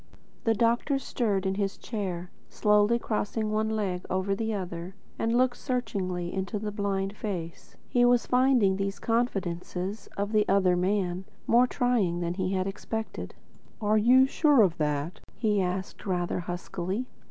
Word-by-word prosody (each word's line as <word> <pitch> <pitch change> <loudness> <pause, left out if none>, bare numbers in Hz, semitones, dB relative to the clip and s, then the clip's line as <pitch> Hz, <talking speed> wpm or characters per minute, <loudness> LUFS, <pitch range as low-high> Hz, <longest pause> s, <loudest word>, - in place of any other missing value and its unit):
The 225 -1 +3
doctor 235 +6 +2
stirred 215 -7 -1
in 190 - +1
his 195 0 -2
chair, 185 -6 -4 0.2
slowly 210 +2 +3
crossed 215 -2 -2
one 215 0 0
leg 200 -5 -1
over 190 +1 0
the 225 +2 -1
other, 180 -2 -5 0.2
and 230 +1 +1
looked 255 0 +2
searchingly 190 -9 -2
into 190 +3 -2
the 210 0 -3
blind 200 -1 -2
face. 175 -7 -6
He 245 - +2
was 245 0 +4
finding 250 -7 +3
these 195 0 -2
confidences 195 -4 -2
of 200 +1 -1
the 215 -1 +3
"other 190 -2 +4
man" 185 0 0 0.2
more 245 +2 +5
trying 235 -10 +1
than 170 0 -1
he 185 0 -2
had 185 -1 0
expected. 220 +3 -5 0.4
"Are 215 -1 +3
you 255 +4 +6
sure 285 -3 +4
of 175 -4 +2
that?" 150 +2 -1 0.2
he 210 -3 +2
asked 185 +2 -3
rather 180 -1 0
huskily. 180 +5 -3
200 Hz, 155 wpm, -28 LUFS, 185-225 Hz, 0.4 s, you